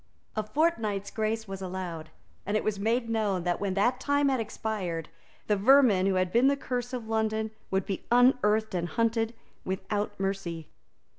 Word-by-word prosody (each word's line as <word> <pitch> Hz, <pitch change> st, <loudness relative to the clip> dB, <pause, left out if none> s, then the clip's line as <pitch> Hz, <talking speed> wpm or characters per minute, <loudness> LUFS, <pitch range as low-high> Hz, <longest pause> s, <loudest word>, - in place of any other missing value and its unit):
A 215 Hz, -, +1 dB
fortnight's 215 Hz, -, 0 dB
grace 220 Hz, 0 st, -2 dB
was 195 Hz, 0 st, -6 dB
allowed; 180 Hz, -4 st, -5 dB, 0.3 s
and 205 Hz, +2 st, 0 dB
it -, -, -2 dB
was 210 Hz, -2 st, -1 dB
made 230 Hz, +3 st, +1 dB
known 210 Hz, -5 st, 0 dB
that, 175 Hz, 0 st, 0 dB
when 195 Hz, -2 st, -1 dB
that 240 Hz, +6 st, +2 dB
time 285 Hz, 0 st, +2 dB
had 265 Hz, -2 st, +1 dB
expired, 205 Hz, -7 st, -3 dB, 0.4 s
the 210 Hz, -, +2 dB
vermin 210 Hz, -3 st, +5 dB
who 195 Hz, -, +2 dB
had 185 Hz, -1 st, +1 dB
been 240 Hz, +5 st, +4 dB
the 280 Hz, 0 st, +3 dB
curse 245 Hz, -3 st, -3 dB
of 245 Hz, -3 st, -5 dB
London 220 Hz, 0 st, 0 dB, 0.2 s
would 190 Hz, 0 st, 0 dB
be 195 Hz, -, -4 dB
unearthed 235 Hz, -4 st, +4 dB
and 175 Hz, -1 st, -1 dB
hunted 230 Hz, 0 st, 0 dB, 0.3 s
without 205 Hz, +2 st, -3 dB
mercy. 195 Hz, -5 st, -3 dB
215 Hz, 170 wpm, -28 LUFS, 190-230 Hz, 0.4 s, vermin